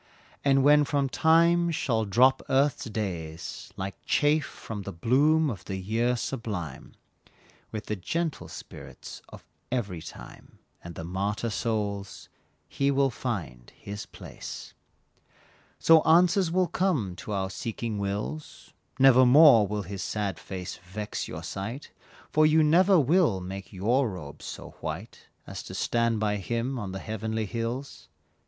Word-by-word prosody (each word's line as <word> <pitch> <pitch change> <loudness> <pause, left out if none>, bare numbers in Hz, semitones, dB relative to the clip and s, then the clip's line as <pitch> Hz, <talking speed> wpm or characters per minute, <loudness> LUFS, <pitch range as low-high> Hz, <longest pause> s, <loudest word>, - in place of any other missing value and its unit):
And 135 -1 +4
when 150 +1 +6
from 140 -1 0
Time 170 +3 +4
shall 125 -9 0
drop 130 +7 +4
Earth's 135 +1 +2
days 85 -7 -5
Like 95 0 -6
chaff 150 -1 +2
from 110 -3 -7
the 100 - -6
bloom 145 - +3
of 100 - -8
the 95 - -4
year 115 +6 0
sublime, 105 - -5 0.8
With 110 0 -5
the 105 - -2
gentle 160 - -3
spirits - - -10
of - - -13 0.3
every 100 -10 -2
time, 80 - -12 0.3
And 85 -1 -9
the - - -6
martyr 100 +6 -2
souls, 105 -3 -3 0.4
he 140 0 0
will 135 -1 +2
find 95 - -5
his 100 0 -7
place. - - -9 1.0
So 165 -1 +6
answers 175 +3 +4
will 185 +2 +2
come 160 - 0
to 105 - -7
our 95 -1 -1
seeking 115 0 -4
wills, 100 +10 -5 0.2
Nevermore 130 -2 +7
will 105 +1 -3
his 95 +1 -6
sad 100 -5 -2
face 90 -2 -6
vex 95 +4 -5
your - - -7
sight, 115 +9 -6 0.4
For 155 0 +5
you 155 +1 +4
never 180 +4 +5
will 150 - +3
make 95 +1 -7
your 115 +7 +1
robes 80 -7 -9
so - - -8
white - - -6 0.2
As - - -7
to - - -9
stand 115 -2 +1
by 105 -1 0
him 120 +6 -2
on 100 -4 -5
the 95 - -5
heavenly 110 +1 -3
hills. 115 +5 -5
115 Hz, 140 wpm, -27 LUFS, 100-140 Hz, 1.0 s, Nevermore